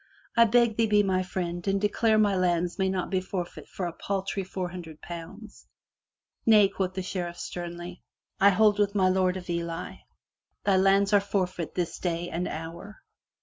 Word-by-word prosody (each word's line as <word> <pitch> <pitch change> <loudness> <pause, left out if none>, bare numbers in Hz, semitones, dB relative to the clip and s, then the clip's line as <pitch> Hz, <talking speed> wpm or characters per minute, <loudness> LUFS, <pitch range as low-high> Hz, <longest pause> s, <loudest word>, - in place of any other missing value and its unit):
" - - -33
I 235 -1 +7
beg 235 -1 +3
thee 225 -1 +3
be 210 -1 +4
my 185 -1 +1
friend 175 -1 -4
and 195 0 +2
declare 215 +2 +2
my 205 -2 +3
lands 175 0 0
may 190 0 +2
not 190 -1 -2
be 185 -1 +1
forfeit 185 -2 -5
for 185 - -4
a 170 - -4
paltry 195 +2 -3
four 185 -1 -4
hun 180 0 -7
dred 160 -2 -12
pounds. 175 +6 -10 0.8
"Nay," 210 -3 +6
quoth 185 -2 -3
the 190 - -2
Sheriff 175 -2 -4
sternly. 175 0 -6 0.4
"I 200 - +7
hold 210 +1 +4
with 205 0 +1
my 190 -2 +4
Lord 185 0 +2
of 180 - -9
Ely. 170 0 -4 0.7
Thy 195 -2 +3
lands 195 +2 +3
are 205 - +6
forfeit 185 -4 -2
this 175 -2 -2
day 175 -1 -2
and 175 +2 -2
hour." 165 +6 -8
185 Hz, 190 wpm, -27 LUFS, 175-200 Hz, 0.8 s, I